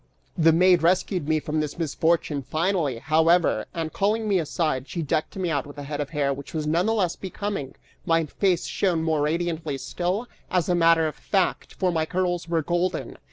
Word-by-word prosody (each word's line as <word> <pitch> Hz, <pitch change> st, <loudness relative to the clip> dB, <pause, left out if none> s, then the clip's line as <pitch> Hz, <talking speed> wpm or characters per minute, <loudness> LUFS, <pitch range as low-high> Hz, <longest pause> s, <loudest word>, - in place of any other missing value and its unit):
The 165 Hz, 0 st, +5 dB
maid 180 Hz, +1 st, +5 dB
rescued 180 Hz, -1 st, +1 dB
me 155 Hz, 0 st, +3 dB
from 155 Hz, 0 st, -2 dB
this 150 Hz, -1 st, -3 dB
misfortune 160 Hz, -2 st, 0 dB
finally, 155 Hz, -2 st, 0 dB
however, 160 Hz, +6 st, +2 dB
and 165 Hz, -3 st, -4 dB
calling 215 Hz, +2 st, 0 dB
me 195 Hz, -3 st, +3 dB
aside, 150 Hz, -4 st, -1 dB
she 170 Hz, -, -3 dB
decked 155 Hz, +1 st, -1 dB
me 185 Hz, -3 st, -1 dB
out 145 Hz, -3 st, -1 dB
with 145 Hz, -, -12 dB
a 145 Hz, -, -6 dB
head 145 Hz, +1 st, -4 dB
of 145 Hz, -, -4 dB
hair 145 Hz, -3 st, 0 dB
which 140 Hz, +3 st, -9 dB
was 155 Hz, -1 st, -1 dB
none 170 Hz, +6 st, +1 dB
the 225 Hz, -, +2 dB
less 185 Hz, -6 st, +1 dB
becoming; 195 Hz, -7 st, -5 dB, 0.3 s
my 165 Hz, -1 st, +2 dB
face 180 Hz, +3 st, 0 dB
shone 175 Hz, -5 st, 0 dB
more 160 Hz, -2 st, +1 dB
radiantly 160 Hz, -1 st, -1 dB
still, 180 Hz, -, -2 dB, 0.2 s
as 180 Hz, -3 st, +1 dB
a 180 Hz, -, +2 dB
matter 165 Hz, -1 st, +4 dB
of 155 Hz, -, -4 dB
fact, 190 Hz, -3 st, -1 dB
for 185 Hz, -2 st, +1 dB
my 160 Hz, -2 st, 0 dB
curls 175 Hz, -1 st, -1 dB
were 165 Hz, -2 st, +1 dB
golden! 175 Hz, +3 st, -2 dB
165 Hz, 200 wpm, -25 LUFS, 155-180 Hz, 0.3 s, The